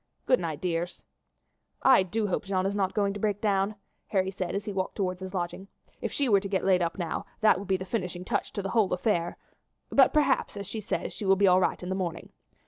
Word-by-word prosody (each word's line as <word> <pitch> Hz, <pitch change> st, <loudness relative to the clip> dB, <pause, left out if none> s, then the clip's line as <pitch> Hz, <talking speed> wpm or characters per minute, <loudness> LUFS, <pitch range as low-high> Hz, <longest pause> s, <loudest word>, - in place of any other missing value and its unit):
Good 255 Hz, -, +4 dB
night, 160 Hz, -4 st, -3 dB
dears!" 175 Hz, -1 st, -3 dB, 0.8 s
"I 260 Hz, -6 st, +7 dB
do 210 Hz, +4 st, -1 dB
hope 205 Hz, +1 st, -1 dB
Jeanne 190 Hz, -1 st, 0 dB
is 195 Hz, -, 0 dB
not 195 Hz, -2 st, -1 dB
going 200 Hz, -2 st, +1 dB
to 205 Hz, -, -6 dB
break 205 Hz, -1 st, 0 dB
down," 200 Hz, 0 st, +1 dB, 0.3 s
Harry 190 Hz, -2 st, 0 dB
said 185 Hz, -1 st, -3 dB
as 200 Hz, +1 st, -3 dB
he 205 Hz, -, -4 dB
walked 190 Hz, -1 st, -2 dB
towards 185 Hz, -3 st, -1 dB
his 190 Hz, +1 st, -7 dB
lodging. 180 Hz, +2 st, -3 dB, 0.3 s
"If -, -, -2 dB
she 280 Hz, -, 0 dB
were 205 Hz, -4 st, +5 dB
to 195 Hz, -, -5 dB
get 190 Hz, -1 st, 0 dB
laid 185 Hz, -2 st, +4 dB
up 170 Hz, +2 st, -1 dB
now 170 Hz, -3 st, -3 dB
that 215 Hz, -2 st, +5 dB
would 200 Hz, -, -7 dB
be 190 Hz, -1 st, +2 dB
the 185 Hz, -, -6 dB
finishing 180 Hz, -3 st, -3 dB
touch -, -, -1 dB
to 200 Hz, -, -3 dB
the 195 Hz, -, -3 dB
whole 220 Hz, -5 st, +2 dB
affair; 180 Hz, -3 st, 0 dB, 0.5 s
but -, -, +6 dB
perhaps, 290 Hz, -8 st, +2 dB
as 200 Hz, -, -5 dB
she 215 Hz, +3 st, -5 dB
says, 210 Hz, -, -3 dB
she -, -, -6 dB
will 195 Hz, 0 st, +5 dB
be 200 Hz, +1 st, +3 dB
all 185 Hz, -1 st, +6 dB
right 185 Hz, -, 0 dB
in 180 Hz, -, -5 dB
the -, -, 0 dB
morning. 175 Hz, -3 st, -4 dB
195 Hz, 245 wpm, -28 LUFS, 185-205 Hz, 0.8 s, I